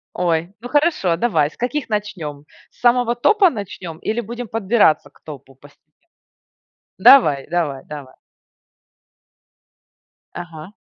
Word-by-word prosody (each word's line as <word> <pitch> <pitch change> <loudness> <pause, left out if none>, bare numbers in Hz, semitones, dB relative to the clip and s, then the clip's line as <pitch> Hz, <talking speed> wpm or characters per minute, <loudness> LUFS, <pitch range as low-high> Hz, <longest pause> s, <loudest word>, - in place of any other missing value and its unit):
Ой, 170 0 -1
ну 245 - -8
хорошо, 290 - +1
давай. 175 -8 +1
С - - -22
каких 255 +2 -3
начнем? 170 -9 -5 0.2
С - - -30
самого 240 -1 +2
топа 385 - +4
начнем 195 - -8
или 220 +7 -3
будем 235 +2 -7
подбираться 205 -9 +1
к - - -27
топу 135 -3 -12
постепенно? 145 +3 -21 1.1
Давай 150 - +5
давай 150 -6 -2
давай! 145 -4 -10 2.2
Ага. 170 +2 -9
180 Hz, 115 wpm, -19 LUFS, 155-240 Hz, 2.2 s, Давай